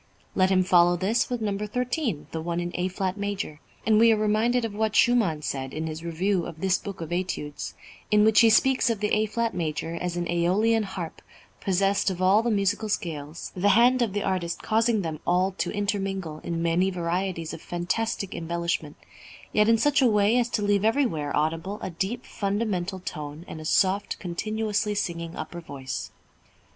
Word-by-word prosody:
Let 185 -1 +3
him 185 -1 +4
follow 175 -1 +4
this 205 +7 +1
with 245 -2 -2
number 210 0 -2
thirteen, 250 - -2
the 160 - -3
one 170 +1 -2
in 175 0 -3
A 180 +1 -1
flat 185 +1 -2
major, 200 -7 -3 0.3
and 215 -1 +4
we 230 0 +7
are 220 - +3
reminded 220 +3 +2
of 220 - -4
what 215 0 -1
Schumann 205 -13 +3
said, 135 -2 -4
in 160 +1 -2
his 160 0 -5
review 175 +2 0
of 165 -2 -9
this 190 +1 +2
book 200 -4 -7
of 165 0 -6
Études, 175 -5 -3 0.3
in 210 0 +5
which 220 0 +5
he 230 - +7
speaks 260 +2 +4
of 225 -3 -1
the 210 0 0
A 215 0 +2
flat 230 +1 -1
major 165 -1 -3
as 175 +1 -3
"an 175 - -1
æolian 200 +7 +2
harp, 185 -4 -6 0.4
possessed 195 +1 +1
of 185 -2 -4
all 190 +3 +5
the 235 - -1
musical 205 0 0
scales, 160 -5 -4
the 195 +2 +2
hand 250 +2 +5
of 225 -5 +1
the 205 - -1
artist 180 -3 -2
causing 220 -1 +2
them 160 -2 -4
all 180 +2 +3
to - - 0
intermingle 195 -6 -2
in 170 0 -3
many 170 +3 +2
varieties 175 -1 -2
of 165 - -8
fantastic 190 +3 -2
embellishment, 170 -2 -2 0.6
yet 210 +1 +4
in 230 - +5
such 290 +5 +3
a 260 - +5
way 210 +1 +3
as 240 0 0
to 215 - -1
leave 205 -1 +2
everywhere 220 - +1
audible 165 +6 -1
a 190 - -3
deep 195 +8 -3
fundamental 200 -2 -2
tone 150 -1 -6
and 160 - -7
a - - -9
soft 195 +5 +2
continuously 210 +3 -2
singing 170 -4 -3
upper 165 +2 -6
voice." 135 -5 -6
190 Hz, 190 wpm, -26 LUFS, 170-215 Hz, 0.6 s, we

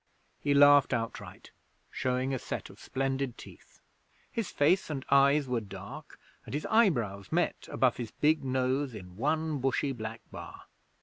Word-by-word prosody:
He 145 -1 +1
laughed 145 -1 +7
outright, 115 -1 -6 0.4
showing 130 +1 -1
a 130 - -1
set - - -5
of - - -17
splendid 135 -1 -2
teeth. - - -15 0.5
His 230 -4 -3
face 165 +7 +2
and 140 -3 -4
eyes 140 +1 +5
were 125 -2 0
dark, 100 +9 -10 0.2
and - - -6
his 150 - -3
eyebrows 120 - +2
met - - 0
above - - +2
his 120 -2 -4
big 155 +5 +1
nose 130 0 0
in 90 -3 -10
one 155 +5 0
bushy 135 +2 0
black 115 -2 -6
bar. - - -9
135 Hz, 150 wpm, -30 LUFS, 120-145 Hz, 0.5 s, laughed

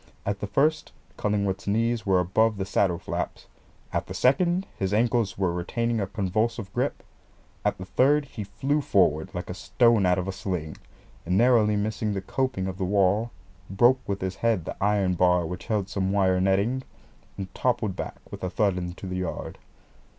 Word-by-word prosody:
At 100 0 -1
the 100 - -3
first, 155 +8 +1 0.2
Cullingworth's 100 -2 -1
knees 115 +2 0
were 95 -1 +4
above 105 +5 +2
the 95 - -2
saddle 95 -3 +1
flaps, - - -4 0.5
at - - -1
the - - -6
second 175 +8 +2
his 95 +1 -1
ankles 115 -3 +1
were 95 -3 +1
retaining 115 +6 -1
a 100 - -1
convulsive 105 +2 -1
grip, - - -1 0.6
at - - 0
the 95 - -7
third 145 +8 +3
he 110 -5 -7
flew 145 +9 -1
forward 85 - +2
like 90 - -4
a - - -4
stone 100 +4 +3
out 90 +1 +3
of 90 0 -2
a - - -1
sling, 90 -5 -4 0.5
narrowly 105 +3 +4
missed 105 0 -1
the - - -1
coping 130 -3 -1
of 95 -1 -5
the - - -1
wall, 100 +4 +2 0.4
broke 120 +7 +4
with 100 0 -2
his 95 0 -3
head 115 -8 +1
the - - -5
iron 100 -3 +2
bar 90 -1 +3
which 90 +3 -6
held 105 -4 0
some 95 -2 -1
wire 95 -2 +2
netting, 100 +7 +2 0.6
and 95 -2 -6
toppled 120 -6 0
back - - -5 0.2
with - - -8
a 90 - -1
thud 100 -1 +1
into 90 +2 -6
the 90 -1 -3
yard. 90 -2 -4
100 Hz, 180 wpm, -26 LUFS, 95-115 Hz, 0.6 s, were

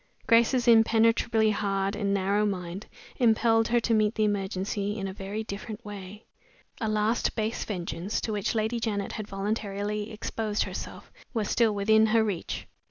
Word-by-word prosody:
Grace's 235 +2 +4
impenetrably 225 -1 +4
hard 195 -1 -1
and 200 -2 -1
narrow 200 +1 +1
mind 185 -1 -3 0.3
impelled 225 -1 +3
her 240 0 +3
to 230 - +1
meet 215 0 +2
the 215 - +1
emergency 200 0 -1
in 195 -2 -3
a 190 - -5
very 200 +3 -5
different 215 +1 -7
way. 205 +1 -9 0.5
A 220 - -1
last 215 +2 +1
base 220 +1 -1
vengeance, 185 0 -3
to 220 - -3
which 205 +3 -1
Lady 220 +2 0
Janet 205 -3 -2
had 215 -2 -5
voluntarily 205 +1 -3
exposed 215 -1 -2
herself, - - -7 0.2
was 215 -3 -1
still 225 -3 +3
within 220 +2 +4
her 225 0 +3
reach. 200 -6 -3
210 Hz, 160 wpm, -27 LUFS, 200-225 Hz, 0.5 s, Grace's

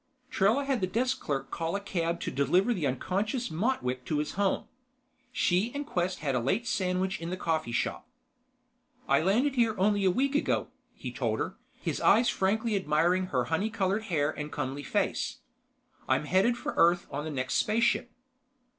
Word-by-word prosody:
Trella 220 +9 +2
had 270 -5 0
the 185 - +1
desk 255 +6 0
clerk 140 -2 -3
call 165 +2 -2
a - - 0
cab 170 -4 -2
to - - -3
deliver 175 - +2
the 170 -9 -1
unconscious 200 - -1
Motwick 155 - -1
to 155 - -1
his 150 0 -1
home. 200 -1 0 0.6
She 210 -2 +1
and 290 0 -3
Quest 180 - -2
had 140 -3 0
a 125 - +2
late 190 - 0
sandwich 185 -3 -1
in 165 - -4
the 185 - -3
coffee 160 -8 -1
shop. 120 - -2 1.0
"I - - +4
landed 230 - +2
here 230 -4 +2
only 205 +1 +2
a 190 - +5
week 270 +9 +1
ago," 290 - 0 0.3
he - - -6
told - - -1
her, - - -3 0.2
his - - -3
eyes 235 +2 +5
frankly 215 +3 +1
admiring 180 +1 +2
her 125 -7 0
honey 160 - 0
colored 210 0 -1
hair 155 -7 +1
and 150 -1 -6
comely 140 0 -3
face. - - -1 0.7
"I'm - - +2
heading 190 +9 +3
for - - -4
Earth 175 +1 +4
on 145 +1 -3
the 160 - -4
next 130 -3 -2
spaceship." 230 +2 +2
185 Hz, 180 wpm, -29 LUFS, 155-220 Hz, 1.0 s, a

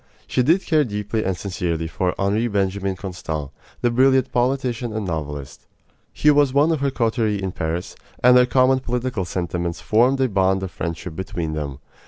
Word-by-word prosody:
She 130 - 0
did 165 +9 +3
care 155 -3 +3
deeply 105 -1 -2
and 95 -2 -1
sincerely 85 -4 -2
for 90 +2 -1
Henri 105 +4 +1
Benjamin 100 -2 -1
Constant, 80 -6 -5 0.3
the 120 - +2
brilliant 130 +1 +3
politician 125 -2 0
and 110 -1 -3
novelist. 75 -5 -5 0.4
He 150 - +3
was 145 -2 +3
one 150 +4 +4
of 160 - 0
her 140 0 +1
coterie 115 -4 0
in 95 -1 -3
Paris, 80 +1 -4 0.3
and 125 0 +7
their 125 0 +6
common 130 +1 +3
political 125 -5 -2
sentiments 85 -1 -3
formed 125 +5 +3
a 130 - +3
bond 95 -2 +1
of 95 - -4
friendship 85 0 -5
between 85 -3 -4
them. 70 -3 -4
105 Hz, 175 wpm, -22 LUFS, 90-130 Hz, 0.4 s, and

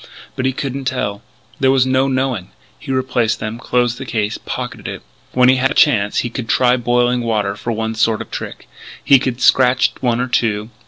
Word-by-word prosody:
But 130 - -1
he - - +1
couldn't 135 0 -4
tell; 105 -6 -2 0.4
there 135 - +3
was 130 -1 +4
no 130 +1 +2
knowing. 130 -8 -1 0.3
He 135 - -6
replaced 125 -4 0
them, 110 +1 -5
closed 120 -1 0
the 135 - -6
case, 110 -2 -2
pocketed - - -5
it. - - -7 0.3
When 125 0 +4
he 130 +1 +5
had 130 +1 +2
a 150 - -4
chance 105 -9 +3
he - - -2
could 120 -2 -5
try 125 -1 +3
boiling 120 0 +1
water 105 -4 -1
for 115 +3 -4
one 110 0 -2
sort 110 0 +1
of - - -8
trick. - - -7 0.4
He 140 - +6
could 130 -1 -3
scratch 125 -1 +4
one 120 -2 +1
or 125 - -1
two.... 110 -3 -1
125 Hz, 205 wpm, -18 LUFS, 110-130 Hz, 0.4 s, He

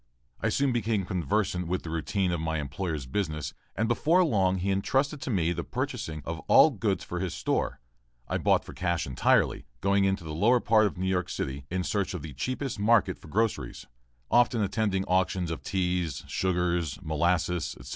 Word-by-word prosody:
I - - 0
soon 140 -1 +1
became 110 -4 0
conversant 90 +1 -1
with 90 +2 -2
the 80 - -6
routine 90 +3 0
of 85 -2 -1
my 80 0 -1
employer's 75 0 -3
business 75 -2 -3 0.2
and 115 - 0
before 160 +10 +3
long 95 - +2
he 95 +2 -1
entrusted 135 +9 0
to 130 - -4
me 85 -7 +1
the 85 0 -4
purchasing 75 -2 -4
of 80 0 -4
all - - +7
goods - - -1
for 90 - -4
his 90 -1 -3
store. 65 - -1 0.5
I - - -1
bought - - +2
for - - -9
cash 85 -2 -1
entirely, 65 +1 +2
going 100 0 +2
into 95 -2 0
the 80 -1 -6
lower 115 +10 +4
part 110 -2 +4
of 95 - -7
New 95 - -2
York 90 -1 0
City 70 -3 -4
in 90 +1 -1
search 100 -1 -1
of 80 - -6
the 80 -3 -7
cheapest 130 - -3
market 110 +1 +3
for - - -14
groceries, 110 +7 -1 0.5
often 120 -2 +4
attending 100 -1 0
auctions 90 -2 +1
of 80 - -4
teas, 90 -5 -1
sugars, 85 -4 0
molasses, 85 -1 0
etc. 65 +2 -11
90 Hz, 185 wpm, -28 LUFS, 80-105 Hz, 0.5 s, all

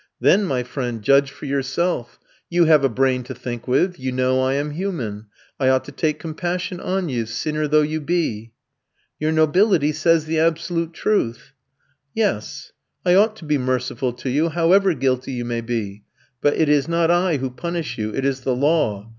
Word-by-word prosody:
"Then, 205 +1 +4
my 130 -7 -1
friend, 120 -3 -4
judge 140 +4 +4
for 145 - -11
yourself. 140 0 -2 0.3
You 175 -1 +3
have 155 -3 +5
a 135 - +3
brain 130 +1 +1
to 130 +1 -7
think 120 -1 -6
with, 175 +8 +1
you 130 0 -3
know 130 +1 +1
I 130 +1 +1
am 145 +1 -2
human, 130 - -4 0.3
I 130 -2 +3
ought 130 0 +2
to - - -9
take 150 +2 -1
compassion 175 +3 -4
on 185 0 -2
you, 120 -6 -2
sinner 150 +7 -2
though 150 +1 +4
you 155 +1 -2
be." 140 -9 -2 0.7
"Your 155 +1 0
nobility 160 0 +3
says 155 +1 +2
the 160 0 -1
absolute 165 +1 0
truth." 135 - -1 0.6
"Yes, 205 - -2 0.3
I 180 - +4
ought 215 +3 +4
to 185 - -12
be 150 -1 +1
merciful 125 0 -1
to 125 +1 -5
you 155 +5 +1
however 175 +3 +3
guilty 130 0 -1
you 120 -1 -3
may 120 -1 -2
be. 105 -4 -4 0.4
But 145 - +3
it 160 - +2
is 145 -1 +3
not 170 0 +2
I 175 -2 +2
who 130 -1 -3
punish 165 -3 -4
you, 110 0 -2
it 135 - -2
is 135 -1 0
the 130 -1 0
law. 130 -8 +1
145 Hz, 190 wpm, -21 LUFS, 125-165 Hz, 0.7 s, have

